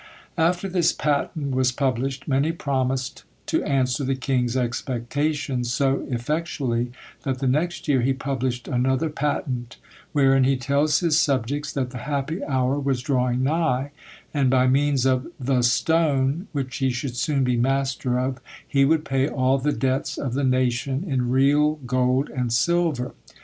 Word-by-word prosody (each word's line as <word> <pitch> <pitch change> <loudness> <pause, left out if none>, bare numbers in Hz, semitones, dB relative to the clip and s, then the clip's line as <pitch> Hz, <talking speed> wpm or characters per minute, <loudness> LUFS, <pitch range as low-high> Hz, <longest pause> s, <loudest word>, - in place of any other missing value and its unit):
After 175 +4 +2
this 180 -3 +2
patent 145 -1 -1
was 130 -1 +2
published, 130 +1 -2
many 140 +3 +2
promised 130 -4 -2 0.2
to - - 0
answer 130 0 0
the 135 0 0
king's 130 -2 0
expectations 125 +2 -2
so 135 +1 0
effectually, 125 -2 -2 0.3
that 130 -1 -2
the 135 - -3
next 160 +8 -1
year 135 -4 +3
he 130 +3 +2
published 130 -2 -2
another 130 +3 +1
patent; 130 -4 -3 0.3
wherein 135 -2 +4
he 135 +1 +2
tells 140 +5 +1
his 160 -3 +3
subjects, 140 +1 0
that 130 -3 -2
the 125 - -6
happy 145 - -3
hour 130 +1 0
was 135 -3 -1
drawing 125 -1 +1
nigh, 145 -2 0 0.4
and 140 -3 +2
by 130 0 +4
means 135 0 +2
of 130 +1 +1
THE 130 -1 +1
STONE, 145 - +2
which 135 -5 -3
he 135 -2 +1
should 125 0 -3
soon 135 +2 0
be 125 -1 +1
master 130 0 0
of, 130 0 -2 0.3
he 135 -1 +3
would 155 +1 +2
pay 135 0 +1
all 130 0 +1
the 150 +3 0
debts 130 +1 -1
of 130 -4 -3
the 140 +2 -1
nation 130 +3 0
in 130 -5 0
real 145 +4 +3
gold 130 +2 +1
and 125 -3 -2
silver. 145 0 +1
135 Hz, 155 wpm, -24 LUFS, 125-145 Hz, 0.4 s, wherein